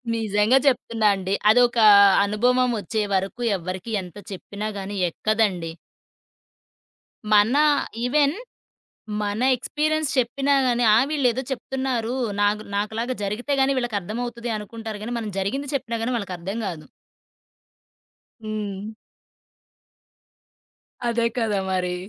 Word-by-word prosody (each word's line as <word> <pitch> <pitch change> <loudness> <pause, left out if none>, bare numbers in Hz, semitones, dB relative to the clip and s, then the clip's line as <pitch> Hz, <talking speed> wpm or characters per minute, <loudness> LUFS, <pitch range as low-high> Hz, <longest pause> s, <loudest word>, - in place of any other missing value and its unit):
నిజంగా 220 +2 +2
చెప్తున్నా 230 -4 +1
అండి. 190 0 -3 0.2
అదొక 240 +1 +4 0.5
అనుభవం 250 +5 +2
వచ్చే 215 +1 -2
వరకు 195 +5 -1 0.2
ఎవ్వరికీ 185 +5 -6
ఎంత 180 -1 -11
చెప్పినా 200 +2 -6
గాని 195 +1 -6
ఎక్కదండి. 190 -5 -1 1.6
మన 210 +6 +5 0.5
ఈవెన్ 285 +3 +3 0.9
మన 210 +2 -2
ఎక్స్పీరియన్స్ 305 +3 -1
చెప్పినా 270 +3 +1
గాని, 245 -1 +1
"ఆ! - - +5
వీళ్లేదో 260 -4 +1
చెప్తున్నారు. 260 -2 -2 0.3
నాకు 210 +1 +1
నాకులాగా 220 +5 -2
జరిగితే 210 +8 -3
గాని 270 0 +2
వీళ్ళకర్థమవుతది" 235 +1 -3
అనుకుంటారు 220 0 -7
గానీ, 240 +2 -4
మనం 220 -2 -4
జరిగింది 270 +9 -2
చెప్పినా 235 -4 -2
గాని 250 +2 -1
వాళ్ళకర్థం 195 0 -5
కాదు. 165 -4 -7 1.6
హ్మ్. 210 -1 -5 2.2
అదే 235 0 +1
కదా 215 -4 0
మరి! 180 -1 -1
225 Hz, 105 wpm, -23 LUFS, 205-245 Hz, 2.2 s, మన